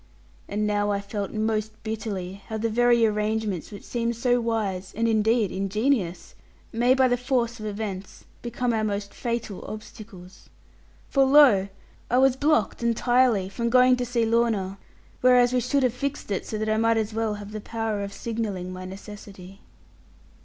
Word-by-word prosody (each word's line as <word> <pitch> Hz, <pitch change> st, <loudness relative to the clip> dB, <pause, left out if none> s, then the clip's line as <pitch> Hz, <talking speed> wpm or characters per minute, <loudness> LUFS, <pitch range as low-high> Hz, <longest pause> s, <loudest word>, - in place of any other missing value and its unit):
And 210 Hz, +1 st, -1 dB
now 205 Hz, 0 st, +1 dB
I 200 Hz, -1 st, 0 dB
felt 200 Hz, 0 st, -4 dB
most 215 Hz, 0 st, -1 dB
bitterly 200 Hz, -4 st, -5 dB
how 220 Hz, -, -4 dB
the 225 Hz, +1 st, -1 dB
very 240 Hz, 0 st, +4 dB
arrangements 210 Hz, -4 st, -1 dB
which 205 Hz, -, -9 dB
seemed 235 Hz, -1 st, -2 dB
so 245 Hz, +1 st, +2 dB
wise, 205 Hz, -5 st, -2 dB
and 230 Hz, +1 st, +1 dB
indeed 220 Hz, -1 st, +2 dB
ingenious, 195 Hz, 0 st, -1 dB, 0.4 s
may 245 Hz, +3 st, +3 dB
by 260 Hz, -1 st, +4 dB
the 245 Hz, 0 st, +1 dB
force 245 Hz, -2 st, -1 dB
of 215 Hz, -, -5 dB
events 200 Hz, -2 st, -6 dB, 0.2 s
become 240 Hz, 0 st, -2 dB
our 220 Hz, -1 st, 0 dB
most 200 Hz, -1 st, -3 dB
fatal 235 Hz, -5 st, -4 dB
obstacles. 210 Hz, -3 st, -11 dB, 0.6 s
For 275 Hz, -, +3 dB
lo! 265 Hz, -8 st, +6 dB, 0.4 s
I 245 Hz, -, +2 dB
was 265 Hz, 0 st, +4 dB
blocked 275 Hz, -8 st, +1 dB
entirely 235 Hz, -3 st, +2 dB
from 235 Hz, +4 st, -2 dB
going 255 Hz, +1 st, +5 dB
to 250 Hz, -, -2 dB
see 235 Hz, -1 st, +1 dB
Lorna; 220 Hz, -4 st, 0 dB, 0.4 s
whereas 250 Hz, -1 st, +5 dB
we 250 Hz, -, +3 dB
should 260 Hz, +3 st, +1 dB
have 250 Hz, -3 st, +2 dB
fixed 280 Hz, -3 st, -4 dB
it 195 Hz, -, -2 dB
so 215 Hz, -, -3 dB
that 215 Hz, +1 st, -2 dB
I 215 Hz, -, +2 dB, 0.2 s
as 220 Hz, -1 st, -1 dB
well 220 Hz, -1 st, -1 dB
might -, -, -6 dB
have 205 Hz, 0 st, -9 dB
the 215 Hz, 0 st, -6 dB
power 220 Hz, -2 st, -3 dB
of 200 Hz, -, -5 dB
signalling 205 Hz, -6 st, -4 dB
my 185 Hz, 0 st, -7 dB
necessity. 195 Hz, 0 st, -10 dB
220 Hz, 170 wpm, -25 LUFS, 200-240 Hz, 0.6 s, lo